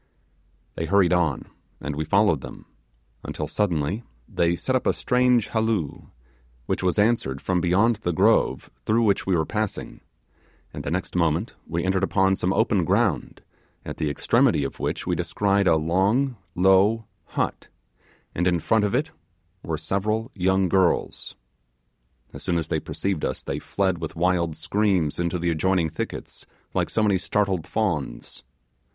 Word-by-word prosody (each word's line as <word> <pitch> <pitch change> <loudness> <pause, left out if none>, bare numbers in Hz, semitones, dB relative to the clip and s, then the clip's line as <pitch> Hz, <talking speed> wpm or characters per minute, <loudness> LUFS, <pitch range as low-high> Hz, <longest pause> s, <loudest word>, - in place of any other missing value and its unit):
They 80 - -3
hurried 95 0 +4
on, 85 -6 +1 0.3
and 75 0 -4
we 80 +1 -2
followed 95 -3 +3
them; - - -10 0.6
until - - -4
suddenly 90 0 -1 0.3
they 85 0 +1
set 130 +9 -1
up 130 - 0
a - - +4
strange 125 -3 +2
halloo, 110 -9 -1 0.6
which - - -2
was 90 -1 0
answered 105 - +1
from 90 +3 0
beyond 105 +7 +3
the 90 -5 -2
grove 80 - +2 0.2
through 115 +2 +3
which 100 -3 +1
we 95 - +3
were 80 -2 +1
passing, 110 +1 -4 0.7
and - - -6
the - - -3
next 90 +4 -3
moment 85 +4 +1
we 85 +1 -2
entered 95 0 +1
upon 95 0 +2
some 90 0 -1
open 105 -3 +2
ground, - - 0 0.4
at - - -6
the 75 - -1
extremity 70 0 +2
of 70 - -5
which - - -2
we - - 0
descried 100 -1 +1
a 80 - +5
long, 95 - +1 0.2
low 95 +5 +4 0.3
hut, - - -1 0.7
and 90 +2 0
in 90 -1 +2
front 110 +6 +2
of 105 +3 0
it 150 +5 0 0.5
were 80 -1 -3
several 105 - -2
young 95 0 +2
girls. 90 0 0 1.0
As - - -8
soon 85 - 0
as 80 - -3
they - - 0
perceived 95 -5 -3
us - - -2
they - - -3
fled 95 -3 -1
with 80 -2 -5
wild 85 -2 +1
screams 95 -3 0
into 85 0 0
the 85 0 0
adjoining 85 +1 +1
thickets, 80 - -6 0.3
like - - 0
so 110 - 0
many 100 -3 +3
startled 95 -3 -1
fawns. 85 -11 -3
95 Hz, 160 wpm, -24 LUFS, 85-105 Hz, 1.0 s, a